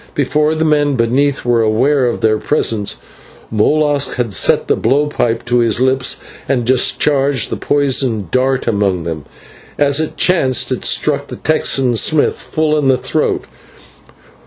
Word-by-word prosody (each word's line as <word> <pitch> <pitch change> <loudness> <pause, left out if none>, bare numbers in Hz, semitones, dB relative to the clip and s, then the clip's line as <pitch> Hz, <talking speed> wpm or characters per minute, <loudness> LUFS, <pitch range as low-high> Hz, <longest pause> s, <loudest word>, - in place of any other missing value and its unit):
Before 150 +2 0
the 160 +1 -1
men 145 -2 +1
beneath 130 +4 0
were 120 -1 +2
aware 125 +5 +1
of 120 - -3
their 110 -1 +1
presence, 110 -8 0 0.6
Molas 145 +6 +1
had 120 -5 -3
set - - +2
the - - +2
blow 135 +6 +1
pipe 120 -6 -2
to 120 0 +1
his 115 -2 0
lips 130 0 +1 0.3
and 125 -4 0
discharged 135 +1 +1
the - - -1
poisoned 130 - -1
dart 130 +1 0
among 100 -6 0
them. 80 -3 -6 0.5
As 140 0 +2
it 160 - -3
chanced 135 -9 +2
it - - -3
struck - - 0
the - - -8
Texan 135 -5 0
Smith 155 +6 +2
full 155 -1 -1
in 140 - 0
the 130 -1 +3
throat. - - -2
130 Hz, 155 wpm, -15 LUFS, 115-145 Hz, 0.6 s, the